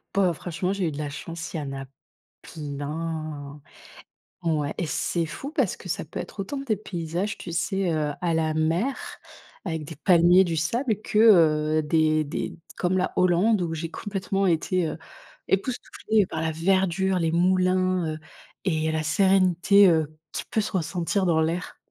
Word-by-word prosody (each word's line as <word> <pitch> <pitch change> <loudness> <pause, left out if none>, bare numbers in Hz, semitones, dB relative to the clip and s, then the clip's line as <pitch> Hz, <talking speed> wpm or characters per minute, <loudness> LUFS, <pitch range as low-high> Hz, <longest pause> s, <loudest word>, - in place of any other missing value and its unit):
Bah, 185 -3 +3
franchement, 180 +3 -3
j'ai 195 -4 -1
eu - - -1
de 140 - -7
la 150 -1 -3
chance, 165 +3 -7
il - - -2
y - - -2
en 140 -1 -5
a 135 0 -6 0.6
plein. 150 -1 -5 0.8
Ouais 155 -3 0
et 175 - -2
c'est 165 +3 -1
fou 170 - -7
parce 270 - 0
que - - -11
ça 160 - -2
peut 155 - -8
être - - -6
autant 195 +9 -4
des 270 -6 -1
paysages, 175 0 -4
tu 170 - -7
sais? 185 +2 0
Heu, 150 -1 0
à 175 -2 0
la 160 -1 +1
mer 165 - +1 0.7
avec 160 -5 -3
des 160 +2 -8
palmiers, 175 +3 +5
du 170 -3 -1
sable 215 - 0
que, 215 - -1 0.6
heu, - - +2
des 155 0 +2
des 145 - -4 0.2
comme 180 +1 0
la 185 - 0
Hollande 185 +3 +3
où 165 -2 -2
j'ai 165 +1 -4
complètement 195 -1 -2
été, 170 0 +1
heu, - - -5 0.5
époustouflée 215 -1 0
par 160 - -4
la 160 - 0
verdure, 190 +2 +1
les 165 -1 +1
moulins, 185 -1 +2
heu, - - -8 0.5
et 160 -4 0
la 160 0 0
sérénité, 190 +3 +4
heu, 155 -2 +1 0.2
qui - - -3
peut 220 - +1
se 210 - -3
ressentir 180 +2 -1
dans 165 -2 +3
l'air. 165 +2 -2
170 Hz, 175 wpm, -25 LUFS, 160-190 Hz, 0.8 s, palmiers